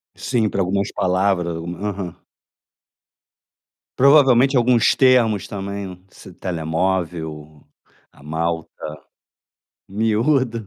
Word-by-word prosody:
Sim, 115 -5 0
para 95 - -1
algumas 100 +2 -1
palavras. 90 -2 0
Algu 85 +1 -5
Aham. 100 -3 -5 1.8
Provavelmente 135 -1 +5
alguns 120 -2 +3
termos 120 -6 +3
também, 100 -2 -6
esse 95 - -14
telemóvel, 80 -3 -3 0.5
a - - -20
malta, 80 +2 -4 1.0
miúda. 115 +3 0
95 Hz, 85 wpm, -20 LUFS, 85-115 Hz, 1.8 s, Provavelmente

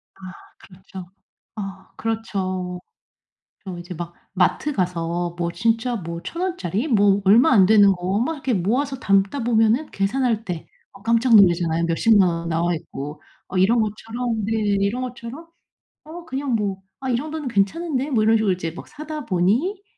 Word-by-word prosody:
아 - - -23 0.4
그렇죠. 185 -1 -12 0.5
아 195 -2 -7
그렇죠. 185 -5 -3 0.8
저 185 -3 -6
이제 175 +1 -8
막 170 +1 -7 0.2
마트 195 +10 +1
가서 175 -3 -2
뭐 170 -1 -1
진짜 230 +3 0
뭐 170 -3 -6
1,000 340 - -5
원짜리 305 - -2
뭐 205 -5 +4
얼마 225 +7 +6
안 195 -5 +6
되는 205 -1 +6
거 185 +2 -1
막 320 +7 0
이렇게 265 -4 -2
모아서 255 +9 0
담다 195 +4 +1
보면은 230 +5 +2
계산할 225 +2 0
때 180 -6 -5 0.3
아 195 - -20
깜짝 230 +1 +4
놀라잖아요, 170 -4 +4
몇 165 - 0
십만 215 -4 +5
원 170 -1 -2
나와있고. 160 -3 -3 0.3
어 185 - -2
이런 220 +6 +4
것처럼 225 +1 -3
네 220 - -1 0.3
이런 230 +6 0
것처럼 250 +5 -7 0.6
'어 335 +3 -9
그냥 270 -4 -2
뭐 200 -3 -2 0.2
아 265 - -3
이 240 - +2
정도는 305 +1 -5
괜찮은데?' 270 - 0
뭐 225 -5 +2
이런 225 +1 +4
식으로 210 -3 +2
이제 165 -3 -4
막 - - -10
사다 305 0 -7
보니 230 - +1
210 Hz, 300 characters per minute, -22 LUFS, 180-250 Hz, 0.8 s, 얼마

